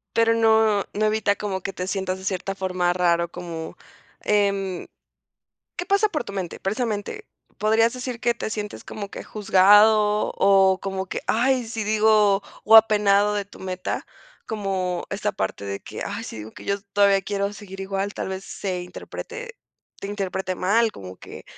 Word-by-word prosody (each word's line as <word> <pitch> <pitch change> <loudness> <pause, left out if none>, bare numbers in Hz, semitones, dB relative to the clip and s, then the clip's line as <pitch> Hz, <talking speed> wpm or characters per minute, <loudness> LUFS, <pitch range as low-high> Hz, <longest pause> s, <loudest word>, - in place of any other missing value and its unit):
Pero 230 0 +4
no, 220 -2 +3
no 215 +1 +1
evita 215 -1 +2
como 195 -3 -3
que 195 - -4
te 180 +1 -4
sientas 190 -1 -2
de 190 - -11
cierta 195 0 -2
forma 180 -2 0
raro 170 -1 +1
como, 165 -2 -7 0.4
em 200 -3 0 0.9
¿Qué 360 - -4
pasa 400 +2 +3
por 305 -5 -2
tu 200 - -8
mente?, 185 -4 -4
precisamente. 215 - -3 0.3
Podrías 225 +2 +3
decir 250 -2 -5
que 240 0 +2
te 220 - -4
sientes 210 -1 -5
como 205 -2 -6
que - - -8
juzgado, 210 +1 +4
o 195 -1 +5
como 190 -1 -3
que, - - -5
¡ay!, 250 +2 +2
si 225 0 -4
digo, 210 -2 +4 0.2
o 225 - +8
apenado 210 -2 +5
de 205 -1 -1
tu - - -15
meta. 185 -1 -4 0.4
Como 190 -4 -2
esta 200 - -1
parte 95 +1 -3
de 100 0 -4
que - - -7
ay, - - -5
sí, - - -7
digo, 110 +1 -8
que - - -12
yo 200 - 0 0.2
todavía 200 -1 +4
quiero 200 +1 -2
seguir 200 -2 -10
igual. 195 +1 -2
Tal - - -4
vez 190 0 -5
se 185 -2 -4
interprete 475 - -8 0.5
te 195 - -5
interprete 190 -2 -3
mal 220 +5 +2
como 95 -1 -10
que - - -11
200 Hz, 170 wpm, -24 LUFS, 190-220 Hz, 0.9 s, o